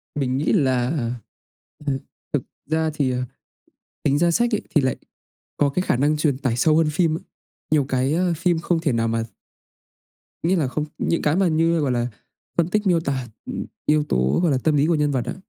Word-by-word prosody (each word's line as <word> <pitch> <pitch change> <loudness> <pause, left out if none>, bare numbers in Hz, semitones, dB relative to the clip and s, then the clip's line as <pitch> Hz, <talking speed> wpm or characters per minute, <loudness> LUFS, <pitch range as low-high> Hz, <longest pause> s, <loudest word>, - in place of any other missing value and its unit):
Mình 130 -3 0
nghĩ 150 - +1
là, 130 - +1 0.8
ừ, 135 -1 0 0.3
thực - - +1 0.3
ra 160 0 +1
thì, 140 -4 +1
ờ, 125 0 -1 0.8
tính 140 0 +2
ra 170 0 +3
sách 235 +5 +2
ấy - - -2
thì 150 - +6
lại 130 - +1 0.6
có 145 -1 +3
cái 180 +6 -1
khả - - +1
năng 150 +3 +2
truyền 150 -4 +1
tải 130 -4 -1
sâu 155 +4 +4
hơn 160 -1 +3
phim 160 -1 +1
ấy, - - -13 0.5
nhiều 145 -3 +3
cái, 130 +2 +1
ờ, 175 +1 +2
phim 170 -1 +1
không 170 0 0
thể 160 -3 0
nào 115 0 +1
mà 115 0 0 1.2
Nghĩa 180 +3 +2
là 145 -6 +1
không 150 +4 -2
những 165 - 0
cái 150 +3 +2
mà 190 -2 +3
như, 165 +1 +2
gọi 140 -4 +1
là, 120 -1 0 0.5
phân 170 0 +2
tích 210 +1 0
miêu 175 -3 +4
tả, 135 -5 -2 0.2
ừm, - - -4 0.2
yếu 150 0 +3
tố, 65 - +2
gọi 175 - +3
là, 130 - +2
tâm 155 -2 +3
lý 145 +2 +3
của 170 - +2
nhân 150 -1 +2
vật 130 -3 0
á. - - -3
150 Hz, 215 wpm, -23 LUFS, 130-165 Hz, 1.2 s, thì